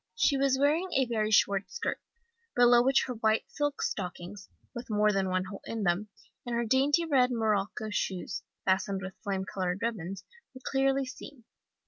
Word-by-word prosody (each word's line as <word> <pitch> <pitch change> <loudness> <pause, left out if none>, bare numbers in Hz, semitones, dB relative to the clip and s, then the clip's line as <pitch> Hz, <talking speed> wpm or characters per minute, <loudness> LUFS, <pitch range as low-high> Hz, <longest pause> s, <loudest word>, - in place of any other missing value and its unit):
"She 305 -10 +3
was 270 -1 +2
wearing 305 +7 +2
a 265 - +3
very 220 -3 -1
short 200 -2 +3
skirt, 475 - -3 0.5
below 240 0 +6
which 265 +2 +3
her 255 - -4
white 220 -1 +1
silk 290 -1 -2
stockings 185 +1 -5 0.2
with 240 -1 -7
more 210 0 +3
than 195 -2 0
one 185 0 0
hole 195 +1 -8
in 225 -2 -4
them 190 +3 0 0.3
and 240 -1 -3
her 235 0 0
dainty 280 +7 +3
red 265 -5 +3
morocco 215 -2 -1
shoes, 190 0 -3 0.2
fastened 190 0 +1
with 190 0 -6
flame 195 -2 -2
coloured 185 +1 -3
ribbons, 195 -5 -3 0.3
were 260 - -10
clearly 270 0 +1
seen. 255 0 -10
220 Hz, 170 wpm, -29 LUFS, 195-265 Hz, 0.5 s, below